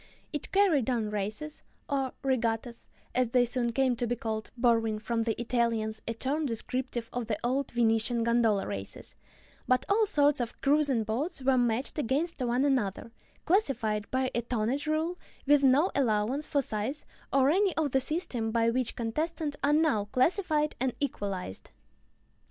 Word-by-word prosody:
It 295 - -4
carried 345 - +3
on 225 -4 -1
races, 215 +10 -4 0.3
or 270 -2 -1
regattas, 235 -2 -1 0.2
as 250 -2 +1
they 245 0 +3
soon 240 0 0
came 260 +1 +2
to 240 - -1
be 245 - 0
called 220 -2 -4
(borrowing 225 -3 +2
from 230 +1 -2
the 225 -1 -1
Italians 230 -2 0
a 230 - -2
term 285 +6 -1
descriptive 240 0 -3
of 245 -2 -3
the 215 -2 -1
old 260 +3 0
Venetian 230 0 +1
gondola 230 -4 +2
races), 100 -1 -7 0.5
but 255 0 +2
all 425 +2 +3
sorts 290 -5 +3
of 235 - -5
cruising 280 -4 +2
boats 265 - -3
were 265 0 +4
matched 245 +4 0
against 295 +4 -1
one 250 +2 +1
another, 230 -6 0 0.3
classified 245 - +1
by 260 0 0
a 235 - 0
tonnage 240 +5 -2
rule 320 +3 -1 0.3
with 290 0 +5
no 275 +7 +4
allowances 245 +2 0
for 285 -1 +1
size 225 +7 -3 0.3
or 270 +1 +4
any 385 0 +2
of 305 -4 +1
the 265 - +3
systems 260 -6 -1
by 230 0 +3
which 250 0 -1
contestants 300 +6 -2
are 285 - +3
now 300 -10 +2
classified 300 - +1
and 260 -1 -1
equalized. 200 - -4
250 Hz, 160 wpm, -29 LUFS, 225-285 Hz, 0.5 s, with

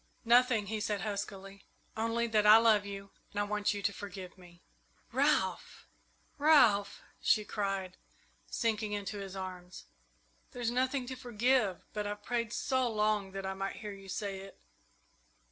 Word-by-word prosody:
"Nothing," 240 -2 +4
he 215 +2 -3
said 210 -1 -1
huskily; 200 -1 -5 0.3
"only 230 +1 0
that 215 -2 +2
I 215 +1 +10
love 220 -3 +4
you 200 0 -7 0.2
and 205 - -4
I - - +2
want 210 0 0
you 200 - -5
to 200 - +1
forgive 190 -3 -8
me." 175 -2 -17 0.5
"Ralph! - - 0 0.5
Ralph!" 245 -10 +4 0.2
she 215 - +3
cried, 195 -3 -3 0.5
sinking 215 -2 -1
into 205 0 -4
his 195 -1 -7
arms, 185 -1 -7 0.7
"there's 240 -1 -1
nothing 255 +1 0
to 260 +1 -5
forgive; 240 -4 +1
but 210 -1 -2
I've 205 0 -5
prayed 235 -2 -1
so 260 0 0
long 210 -3 0
that 195 0 -5
I 190 - -2
might 195 0 -4
hear 210 -1 -7
you 195 -1 -12
say 195 0 -3
it!" 195 0 -12
205 Hz, 155 wpm, -32 LUFS, 195-230 Hz, 0.7 s, I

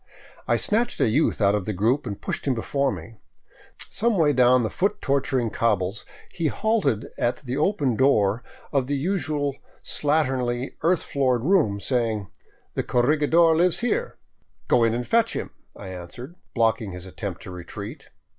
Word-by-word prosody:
I - - +3
snatched 230 +3 0
a - - +3
youth 130 +2 +1
out 100 0 +4
of 105 -3 -1
the 105 - -2
group 115 +9 +1
and 100 - -5
pushed - - -4
him 130 - +2
before 140 +4 0
me. 95 +4 -8 0.7
Some 225 -1 +1
way 150 -4 +4
down 125 -1 +5
the 110 - -2
foot 205 +2 0
torturing 135 -4 0
cobbles 100 -3 0 0.3
he 170 -3 -1
halted 210 - 0
at 120 - 0
the 125 -1 -3
open 145 - +1
door 115 -4 +3 0.3
of 135 -3 +1
the 145 - 0
usual 150 -4 -1 0.3
slatternly, 130 -4 0
earth 175 +2 +2
floored 130 -5 0
room, 150 - +3
saying: 110 -4 -1 0.2
" - - -37
The - - -1
corregidor 155 +6 +3
lives 175 +5 +3
here." 475 - -1 0.3
" - - -42
Go 120 - +4
in 115 0 +2
and 120 0 -2
fetch 230 - +2
him," - - -4 0.2
I 95 - -9
answered, 95 - -8 0.2
blocking 115 -4 +1
his 90 0 -8
attempted 95 -1 -6
retreat. 100 - -8
130 Hz, 165 wpm, -24 LUFS, 110-155 Hz, 0.7 s, down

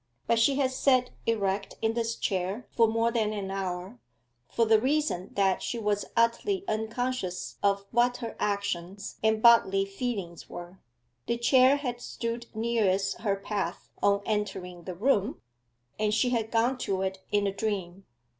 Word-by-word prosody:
But 230 - +2
she 270 +4 +4
had 265 -2 +1
sat 255 -1 +2 0.2
erect 200 -3 0
in 225 0 +1
this 230 0 -1
chair 195 +4 -2
for 230 -1 +4
more 230 +1 +1
than 220 -2 0
an 195 -2 -4
hour, 190 +3 -4 0.5
for 230 - +2
the 220 -1 +4
reason 265 -9 0
that 195 -2 +2
she 240 - -3
was 210 -2 0
utterly 235 - +2
unconscious 220 - -2
of 200 0 +1
what 245 +1 +3
her 230 -2 -6
actions 200 -2 -2
and 220 0 +2
bodily 195 -5 +6
feelings 195 -4 -5
were. 175 +2 -9 0.5
The 235 - 0
chair 255 +3 +5
had 245 -4 -4
stood 235 0 -4
nearest 205 -4 +1
her 205 -3 +1
path 195 -3 -4
on 200 0 +3
entering 190 -5 -3
the 185 - -5
room, 220 +2 +1 0.6
and 215 -1 +2
she 245 +4 +2
had 225 -3 0
gone 240 +3 +1
to 190 -4 -1
it 190 0 -2
in 205 -1 +2
a 195 - 0
dream. 195 -3 -3
215 Hz, 160 wpm, -28 LUFS, 195-235 Hz, 0.6 s, bodily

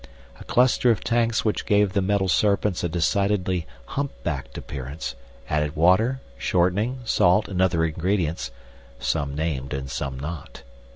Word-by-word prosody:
A - - -9
cluster 125 0 +3
of 110 -4 +2
tanks 115 -1 +1
which 105 - 0
gave 105 -2 +3
the 100 - +2
metal 95 0 +1
serpents 100 0 +2
a 85 - 0
decidedly 90 +1 0 0.2
humpbacked 85 - -4
appearance 70 +3 -5 0.3
added 75 -1 0
water, 105 +11 +3 0.2
shortening, 100 - +1
salt 90 -1 +3
and 95 -2 -1
other 85 -3 +3
ingredients, 80 -4 -1 0.5
some 70 +3 -1
named 75 -3 -2
and 70 0 -5
some 65 -1 -3
not. 75 +1 -7
90 Hz, 135 wpm, -24 LUFS, 75-105 Hz, 0.5 s, cluster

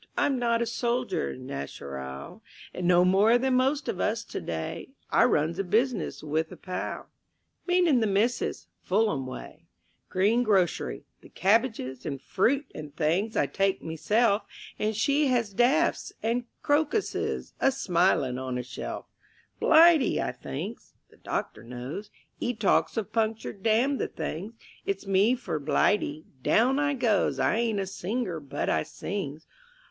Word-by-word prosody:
I'm 270 -3 +2
not 235 -1 +2
a - - -1
soldier 235 -5 -1
nacheral, 70 - -7 0.3
No 180 0 +3
more 200 +6 +5
than 260 +1 +1
most 270 +4 +2
of - - -2
us - - 0
to - - -6
day; - - -5 0.2
I - - +5
runs 165 -5 +1
a - - +1
business 230 +5 0
with 160 +2 -1
a - - -9
pal 185 -1 -5 0.6
(Meaning 355 -7 +4
the 220 - +1
Missis) 215 +4 0 0.2
Fulham 190 -9 +1
way; 130 - -9 0.4
Greengrocery 200 -1 +1 0.2
the - - -15
cabbages 195 - +1
And 140 -3 -4
fruit 250 - +1
and 150 -1 -9
things 175 +8 0
I - - +3
take 195 -1 0
meself, 205 +7 +2 0.4
And 215 +1 0
she 280 +7 +2
has 235 -5 +1
dafts 270 - +2
and 235 +2 0 0.2
crocuses 310 +8 0
A 270 - +4
smiling 175 - +1
on 130 -1 -3
a 125 - -3
shelf. 125 - -6 0.5
"Blighty," 320 -5 +6
I - - -1
thinks. 65 - -7 0.2
The - - -20
doctor 110 - -4
knows; 125 - -7 0.3
'E 245 - -1
talks 210 +2 +2
of 215 -1 -3
punctured 220 -3 -1
damn 235 +6 +2
the - - 0
things. 165 +7 -5 0.3
It's 195 0 -3
me 195 +5 +3
for 200 -10 -4
Blighty. 155 +1 +1 0.2
Down 255 - +3
I 285 -1 +1
goes; 235 -6 +1
I - - +2
ain't 230 -3 0
a 195 - -1
singer, 190 -1 -3
but 140 -2 -4
I - - +2
sings. 155 -2 -5
210 Hz, 145 wpm, -27 LUFS, 160-245 Hz, 0.6 s, Blighty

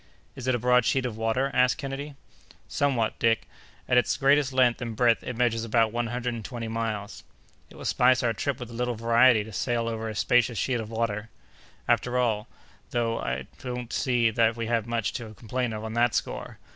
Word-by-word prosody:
"Is 130 -1 -7
it 130 - +3
a - - +1
broad 125 +1 +3
sheet 130 +2 +1
of 120 -4 -3
water?" 115 +5 0
asked 125 -1 +3
Kennedy. 140 +1 -5 0.5
"Somewhat, 130 -6 0
Dick. 115 -1 +2 0.4
At 125 - +5
its - - 0
greatest 140 0 +3
length 125 -2 +3
and 115 -2 -4
breadth, 120 0 +3
it 125 - -5
measures 115 -2 +1
about 115 -1 +2
one 120 +1 -1
hundred 120 +1 -2
and 115 -2 -6
twenty 115 0 -5
miles." 110 -2 -4 0.5
"It - - -16
will - - -9
spice 125 0 +3
our 115 -1 +2
trip 135 +4 -2
with 120 -1 -7
a - - -9
little 120 +1 -1
variety 115 0 +4
to 110 0 -11
sail 115 +3 -1
over 110 -1 -3
a 110 - -6
spacious 125 +1 +2
sheet 125 +5 0
of 110 -1 -6
water." 110 -1 -2 0.6
"After 125 0 +1
all, 115 -3 0 0.4
though, 115 -1 -1
I 65 0 -3 0.2
don't 125 -2 -5
see 120 -3 +2
that 115 0 +2
we 115 -1 -3
have 115 -1 0
much 115 -2 -1
to 110 -3 -7
complain 125 +2 -3
of 110 0 -5
on 110 0 -5
that 120 0 +2
score. - - -3
120 Hz, 210 wpm, -27 LUFS, 115-125 Hz, 0.6 s, At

